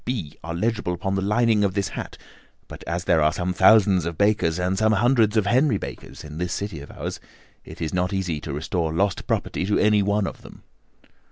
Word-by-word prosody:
B.' 100 - -4
are 85 +1 -5
legible 105 -1 -1
upon 95 +2 -3
the 95 - 0
lining 105 +1 +2
of 100 -1 0
this 100 -1 0
hat, - - -7 0.5
but - - -11
as 85 +1 -2
there 80 - +3
are 75 +1 +4
some 90 +1 -2
thousands 100 -3 +5
of 85 -1 -4
Bakers, 100 -5 +2
and 90 +1 0
some 110 +2 +2
hundreds 115 -1 +3
of 105 - +2
Henry 125 +2 +3
Bakers - - -9
in 75 +1 -8
this 90 +1 -2
city 100 -6 -4
of 70 - -11
ours, - - -6 0.4
it - - -12
is 80 - -3
not 90 0 0
easy 90 -6 -2
to 75 - -6
restore 80 +3 -2
lost 95 +4 -1
property - - -1
to 100 +2 +1
any 105 -1 +3
one 100 +1 +1
of - - -6
them." - - -14
95 Hz, 215 wpm, -23 LUFS, 85-105 Hz, 0.5 s, thousands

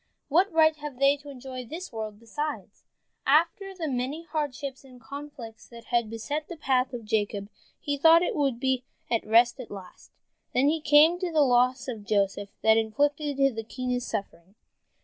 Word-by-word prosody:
What 360 +7 +3
right 315 -1 +4
have 295 -3 -7
they 275 +1 +4
to 285 0 -13
enjoy 260 -1 -7
this 325 +5 -8
world, 215 -2 -5
besides?" 295 +7 -6 0.4
After 340 +7 +2
the 335 -4 -3
many 270 +4 -3
hardships 285 -4 -4
and 255 -2 -15
conflicts 255 -2 -9
that 235 -1 -12
had 235 -2 0
beset 285 +7 -4
the 345 - -8
path 260 -3 +1
of 240 -3 -7
Jacob, 205 -1 -1 0.3
he 285 -1 -2
thought 330 +3 +7
he - - 0
would 275 -6 0
be 260 -1 0 0.3
at 230 - +1
rest 235 +4 +4
at 250 - -8
last, 190 -3 -11 0.5
and 275 +4 +4
then 320 0 -2
came 310 +4 +5
the 365 -2 -2
loss 255 -1 +3
of 225 -5 -5
Joseph 200 -1 0
and 220 0 +5
inflicted 280 +3 +1
the 225 - -4
keenest 250 +1 -3
suffering. 190 -1 -6
265 Hz, 170 wpm, -27 LUFS, 230-295 Hz, 0.5 s, thought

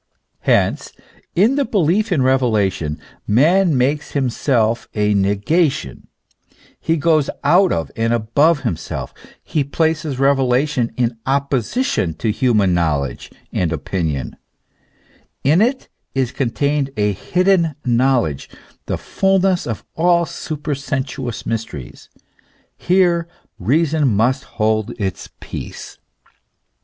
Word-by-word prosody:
Hence, - - +1 0.4
in 225 +10 +3
the 285 - +3
belief 205 - +1
in 150 -7 +2
revelation 105 - +1 0.3
man 160 - +4
makes 140 +4 0
himself 120 -4 0
a 105 -1 +2
negation, 100 - 0 0.7
he 165 0 0
goes 155 -2 +2
out 180 +6 +4
of 80 -3 -2
and 115 +1 0
above 135 +7 +2
himself; 80 -4 -4 0.3
he 150 - -1
places 155 0 -1
revelation 135 -1 +2
in 120 -2 -1
opposition 135 - 0
to 110 +7 -1
human 105 -5 +2
knowledge 70 -7 -1 0.2
and 85 -3 0
opinion; 80 -2 -3 1.1
in 155 +8 +4
it 255 +4 +1 0.3
is 130 -2 0
contained 140 +3 0
a 105 0 +2
hidden 175 - +1
knowledge, 120 - +1 0.4
the - - -1
fulness 195 -1 +1
of 115 -3 -5
all 170 +1 +3
supersensuous 140 -5 -4
mysteries; 110 - -5 0.7
here 175 -2 +2 0.3
reason 150 - +2
must 120 +4 +1
hold 110 0 -1
its 95 -3 -3
peace. - - -8
135 Hz, 105 wpm, -19 LUFS, 110-160 Hz, 1.1 s, man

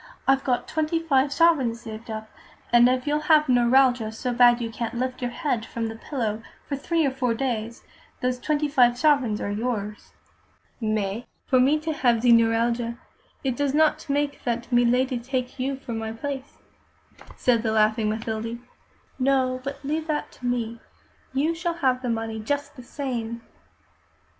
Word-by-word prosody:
I've 270 0 +3
got 250 -2 0
twenty 315 +1 0
five 280 -4 +2
sovereigns 275 -8 +3
saved 225 0 -9
up, 220 0 -5 0.5
and 240 +1 +7
if 255 0 0
you'll 295 0 +1
have 305 -1 +6
neuralgia 245 -2 +4
so 245 +3 -3
bad 240 0 +6
you 230 -1 -3
can't 235 0 -4
lift 255 +1 -3
your 245 - -1
head 250 -4 -2
from 225 0 -4
the 225 - -7
pillow 225 -3 -3 0.3
for 285 - -2
three 325 +3 0
or 275 - +1
four 250 -3 -1
days, 235 -3 -3 0.4
those 250 0 -1
twenty 300 +2 0
five 245 -4 +4
sovereigns 270 -8 +2
are 200 - -3
yours." 210 -1 -4 0.7
"Mais, 215 +1 -1 0.2
for 255 - +3
me 275 +4 +4
to 320 0 -2
have 240 -6 +2
ze 245 - +5
neuralgia, 230 +1 +2 0.5
it 260 -3 0
do 285 +1 0
not 310 -1 +2
make 285 0 -1
that 240 +1 -3
milady 245 +1 +3
take 255 +1 -4
you 270 +2 -1
for 265 -3 -7
my 225 0 -3
place," 270 +4 -6 0.8
said 240 -3 +2
the 220 -1 -1
laughing 215 0 +2
Mathilde. 220 +1 -3 0.6
"No, 255 -1 +1
but 275 +1 -6
leave 310 +3 -2
that 300 -1 -2
to 245 - -7
me. 235 -1 -2 0.5
You 290 +5 +1
shall 340 0 -2
have 260 -6 +1
the 250 - -3
money 225 -1 -2
just 285 +6 -3
the 255 - -10
same." 235 -3 -4
250 Hz, 170 wpm, -25 LUFS, 230-275 Hz, 0.8 s, and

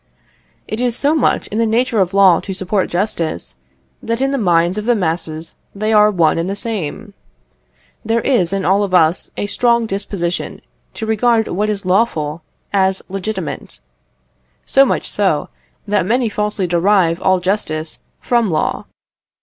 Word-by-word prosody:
It 215 +3 -4
is 245 -2 0
so 290 +2 +2
much 310 -5 +1
in 215 - -2
the 230 - +3
nature 230 0 +1
of 185 -2 +2
law 195 -4 +5
to 195 - -6
support 190 +1 -1
justice, 165 - -2 0.5
that 230 +1 -2
in 270 +1 +1
the 275 - 0
minds 175 -1 +2
of 210 - -6
the 240 0 +3
masses 165 -3 -3 0.2
they 215 +2 -1
are 210 0 +6
one 170 -5 +2
and 170 +3 -2
the 195 - -2
same. 205 -1 -4 0.9
There 225 +1 0
is 190 -10 +2
in 195 -1 -2
all 195 +2 +3
of 190 -2 0
us 165 +1 +2
a - - -1
strong 235 +2 +2
disposition 195 -4 -3 0.3
to 220 - -4
regard 220 0 +2
what 210 +4 -1
is 200 -2 -2
lawful 175 -6 0 0.3
as 190 -1 +1
legitimate, 195 +3 -5 0.9
so 275 0 +5
much - - -1
so, 190 -8 0 0.4
that 205 -3 +1
many 240 +1 +1
falsely 210 -2 -2
derive 175 0 +2
all 185 -1 +3
justice 170 -4 -2 0.2
from 235 -4 +1
law. 155 -2 -1
200 Hz, 160 wpm, -17 LUFS, 175-220 Hz, 0.9 s, are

